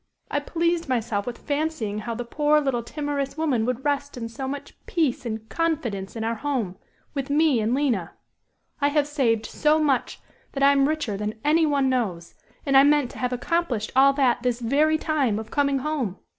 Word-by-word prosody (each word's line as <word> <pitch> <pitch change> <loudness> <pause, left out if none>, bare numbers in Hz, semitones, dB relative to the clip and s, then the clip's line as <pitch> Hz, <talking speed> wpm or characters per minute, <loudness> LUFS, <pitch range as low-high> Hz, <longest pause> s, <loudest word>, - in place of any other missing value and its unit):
I 290 - +1
pleased 335 +1 -1
myself 225 -4 -1
with 245 - -4
fancying 285 -8 -2
how 230 +2 -4
the 240 +1 -4
poor, 300 +4 +2
little 270 -5 0
timorous 290 +2 -3
woman 275 -8 +1
would 255 +2 -2
rest 285 -1 -1
in 230 -1 -5
so 265 +4 -5
much 285 +1 -6
peace 295 -8 0
and 220 -1 -5
confidence 245 -14 -2
in 225 - -3
our 225 +1 0
home 230 -7 -2 0.4
with 275 -1 -3
me 295 -3 +3
and 220 +3 +1
Lina. 245 - 0 0.7
I 285 - +4
have 290 0 +2
saved 235 -7 +1
so 305 0 +2
much 280 -5 0 0.3
that 275 - -1
I 280 - +7
am 275 0 +3
richer 295 -10 -2
than 210 +2 -4
any 315 +2 +4
one 280 -2 +2
knows, 195 -10 -1 0.3
and 275 -1 +1
I 270 - +9
meant 290 -2 +3
to - - -10
have 250 -1 -1
accomplished 250 -4 -1
all 275 +1 +7
that 265 -4 +2
this 245 -1 0
very 295 +6 +2
time 285 -9 0
of 220 0 -7
coming 280 -1 +2
home. 265 -9 -2
270 Hz, 195 wpm, -24 LUFS, 230-295 Hz, 0.7 s, I